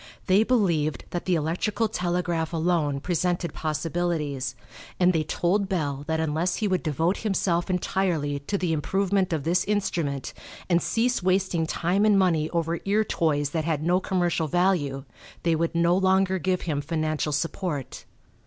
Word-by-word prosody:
They 190 Hz, +3 st, +4 dB
believed 170 Hz, -, +1 dB
that 175 Hz, -, -3 dB
the 185 Hz, -, +2 dB
electrical 180 Hz, +8 st, 0 dB
telegraph 175 Hz, -4 st, -1 dB
alone 160 Hz, -4 st, 0 dB
presented 175 Hz, 0 st, -1 dB
possibilities, 155 Hz, -5 st, -2 dB, 0.4 s
and 180 Hz, 0 st, +4 dB
they 160 Hz, -, +2 dB
told 185 Hz, +6 st, 0 dB
Bell 145 Hz, -6 st, -2 dB
that 160 Hz, 0 st, 0 dB
unless 160 Hz, +3 st, 0 dB
he 215 Hz, -, -1 dB
would 185 Hz, -2 st, +1 dB
devote 165 Hz, +4 st, 0 dB
himself 190 Hz, -4 st, 0 dB
entirely 175 Hz, -5 st, 0 dB
to 170 Hz, +8 st, -2 dB
the 180 Hz, -3 st, 0 dB
improvement 190 Hz, +4 st, 0 dB
of 155 Hz, -4 st, -1 dB
this 175 Hz, +3 st, +2 dB
instrument 170 Hz, -9 st, -1 dB, 0.3 s
and 175 Hz, -1 st, +3 dB
cease 245 Hz, +1 st, +1 dB
wasting 185 Hz, -3 st, +1 dB
time 180 Hz, +5 st, 0 dB
and 210 Hz, -2 st, +5 dB
money 165 Hz, -5 st, +2 dB
over 170 Hz, -1 st, -1 dB
ear 205 Hz, +2 st, +2 dB
toys 145 Hz, -7 st, 0 dB
that 160 Hz, -1 st, -1 dB
had 155 Hz, -2 st, -1 dB
no 175 Hz, +3 st, +3 dB
commercial 175 Hz, -4 st, 0 dB
value 155 Hz, -5 st, +1 dB, 0.4 s
they 170 Hz, -, +2 dB
would 165 Hz, +1 st, -1 dB
no 170 Hz, +1 st, +3 dB
longer 190 Hz, 0 st, +2 dB
give 185 Hz, +1 st, 0 dB
him 150 Hz, -4 st, -2 dB
financial 155 Hz, 0 st, -1 dB
support. 150 Hz, -1 st, -3 dB
170 Hz, 155 wpm, -26 LUFS, 155-185 Hz, 0.4 s, and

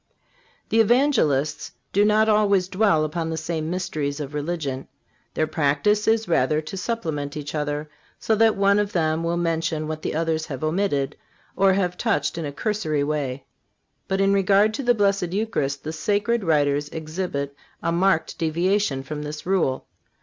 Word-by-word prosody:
The 225 Hz, -, +2 dB
Evangelists 220 Hz, -, +2 dB, 0.2 s
do 200 Hz, -, +4 dB
not 215 Hz, +1 st, +4 dB
always 205 Hz, -4 st, +3 dB
dwell 185 Hz, -5 st, +2 dB
upon 165 Hz, +1 st, -3 dB
the 160 Hz, -, -3 dB
same 160 Hz, 0 st, -3 dB
mysteries 155 Hz, -5 st, -2 dB
of 145 Hz, -1 st, -5 dB
religion. 145 Hz, -3 st, -3 dB, 0.5 s
Their 155 Hz, -, +2 dB
practice 155 Hz, +8 st, +1 dB
is 225 Hz, -1 st, +2 dB
rather 150 Hz, -2 st, +2 dB
to 155 Hz, +5 st, -7 dB
supplement 160 Hz, -9 st, -3 dB
each 145 Hz, -1 st, -6 dB
other, 150 Hz, 0 st, -2 dB, 0.3 s
so 225 Hz, -, +1 dB
that 220 Hz, 0 st, +4 dB
one 200 Hz, +1 st, +3 dB
of 205 Hz, +1 st, -1 dB
them 160 Hz, -2 st, +1 dB
will 170 Hz, +1 st, 0 dB
mention 165 Hz, -2 st, -1 dB
what 155 Hz, 0 st, -4 dB
the -, -, -3 dB
others 160 Hz, -1 st, -1 dB
have 135 Hz, 0 st, -6 dB
omitted 155 Hz, -4 st, 0 dB, 0.4 s
or 195 Hz, 0 st, +4 dB
have 180 Hz, -2 st, -1 dB
touched 225 Hz, -6 st, 0 dB
in 165 Hz, -, -3 dB
a 145 Hz, -, -4 dB
cursory 155 Hz, -4 st, -1 dB
way. 140 Hz, -3 st, -2 dB, 0.6 s
But 195 Hz, -, -1 dB
in 195 Hz, 0 st, +3 dB
regard 200 Hz, +2 st, +4 dB
to 250 Hz, -, -3 dB
the 245 Hz, -2 st, +3 dB
Blessed 200 Hz, -4 st, +1 dB
Eucharist 145 Hz, -10 st, -1 dB
the 155 Hz, -, -4 dB
sacred 210 Hz, +5 st, 0 dB
writers 145 Hz, -3 st, +1 dB
exhibit 155 Hz, -3 st, -4 dB, 0.3 s
a 170 Hz, -, +1 dB
marked 175 Hz, -1 st, +1 dB
deviation 170 Hz, -2 st, +1 dB
from 150 Hz, +2 st, -5 dB
this 150 Hz, 0 st, -6 dB
rule. 175 Hz, -8 st, 0 dB
165 Hz, 165 wpm, -23 LUFS, 150-200 Hz, 0.6 s, do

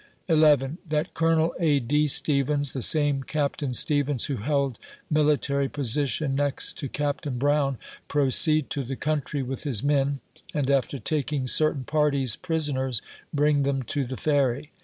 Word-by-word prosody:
11. 155 Hz, -2 st, +3 dB
That 150 Hz, 0 st, -2 dB
Colonel 165 Hz, 0 st, +1 dB
A. 155 Hz, -4 st, +2 dB
B*. 150 Hz, +5 st, +1 dB
Stevens 145 Hz, 0 st, +1 dB
(the 130 Hz, -, -4 dB
same 145 Hz, 0 st, +3 dB
Captain 145 Hz, 0 st, -2 dB
Stevens 145 Hz, 0 st, +2 dB
who 140 Hz, -, -3 dB
held 140 Hz, +1 st, -1 dB, 0.3 s
military 145 Hz, -2 st, +1 dB
position 140 Hz, +1 st, 0 dB
next 140 Hz, 0 st, 0 dB
to 140 Hz, -, -4 dB
Captain 145 Hz, -2 st, -3 dB
Brown) 140 Hz, 0 st, +1 dB, 0.3 s
proceed 145 Hz, +2 st, +3 dB
to 140 Hz, -, -2 dB
the 135 Hz, +2 st, -5 dB
country 145 Hz, -1 st, -2 dB
with 130 Hz, +1 st, -5 dB
his 130 Hz, -9 st, 0 dB
men, 140 Hz, -1 st, +1 dB, 0.4 s
and 140 Hz, -2 st, 0 dB
after 140 Hz, 0 st, 0 dB
taking 140 Hz, +2 st, -1 dB
certain 150 Hz, +1 st, +1 dB
parties 140 Hz, -4 st, +2 dB
prisoners 145 Hz, -, -2 dB, 0.3 s
bring 145 Hz, 0 st, +2 dB
them 135 Hz, -1 st, -1 dB
to 140 Hz, +3 st, -1 dB
the 130 Hz, 0 st, -6 dB
Ferry. 145 Hz, -1 st, 0 dB
145 Hz, 145 wpm, -25 LUFS, 135-150 Hz, 0.4 s, 11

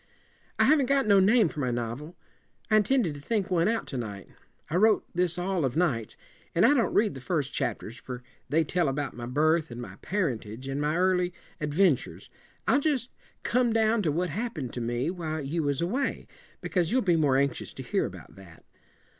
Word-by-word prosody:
"I -, -, +4 dB
haven't 285 Hz, -3 st, +4 dB
got 275 Hz, -1 st, +3 dB
no 200 Hz, -2 st, +5 dB
name 210 Hz, +2 st, +5 dB
for 150 Hz, -, -7 dB
my 130 Hz, -3 st, 0 dB
novel. 120 Hz, +8 st, -4 dB, 0.6 s
I 215 Hz, -, +6 dB
intended 215 Hz, -, +2 dB
to 145 Hz, -, -9 dB
think 205 Hz, +3 st, -1 dB
one 170 Hz, 0 st, +3 dB
out 225 Hz, +1 st, 0 dB
to 135 Hz, -, -4 dB
night. 105 Hz, -5 st, -6 dB, 0.4 s
I 155 Hz, -, -3 dB
wrote 215 Hz, +2 st, +4 dB
this 175 Hz, -1 st, 0 dB
all 180 Hz, -1 st, -1 dB
of 130 Hz, -2 st, -1 dB
nights. 130 Hz, -11 st, 0 dB, 0.4 s
And 170 Hz, -, +5 dB
I 275 Hz, -, +6 dB
don't 245 Hz, -6 st, +2 dB
read 210 Hz, -1 st, +3 dB
the 135 Hz, -, -9 dB
first 145 Hz, -1 st, -2 dB
chapters, 115 Hz, +3 st, -3 dB
for 125 Hz, 0 st, -8 dB, 0.3 s
they 160 Hz, +4 st, +3 dB
tell 170 Hz, +1 st, 0 dB
about 140 Hz, +1 st, -3 dB
my 120 Hz, 0 st, -7 dB
birth 155 Hz, +5 st, +2 dB
and 120 Hz, 0 st, -8 dB
my 100 Hz, -5 st, -8 dB
parentage, 130 Hz, -, -3 dB
and 135 Hz, +1 st, -2 dB
my 150 Hz, +2 st, 0 dB
early 180 Hz, -1 st, +2 dB, 0.3 s
adventures. 150 Hz, -2 st, 0 dB, 0.4 s
I'll 275 Hz, -, +4 dB
just 275 Hz, -6 st, 0 dB, 0.3 s
come 245 Hz, -1 st, +2 dB
down 225 Hz, 0 st, +3 dB
to 165 Hz, -6 st, +1 dB
what 170 Hz, +2 st, -1 dB
happened 175 Hz, -, -4 dB
to 120 Hz, -, -4 dB
me 120 Hz, +6 st, -1 dB
while 160 Hz, -3 st, -4 dB
you 150 Hz, +4 st, -2 dB
was 145 Hz, -1 st, -1 dB
away, 245 Hz, +11 st, -1 dB, 0.4 s
because 175 Hz, -3 st, 0 dB
you'll 255 Hz, +1 st, +2 dB
be 175 Hz, -3 st, +3 dB
more 145 Hz, -5 st, +3 dB
anxious 140 Hz, -2 st, -1 dB
to -, -, -7 dB
hear -, -, 0 dB
about -, -, -12 dB
that. 90 Hz, -4 st, -15 dB
165 Hz, 200 wpm, -28 LUFS, 135-205 Hz, 0.6 s, I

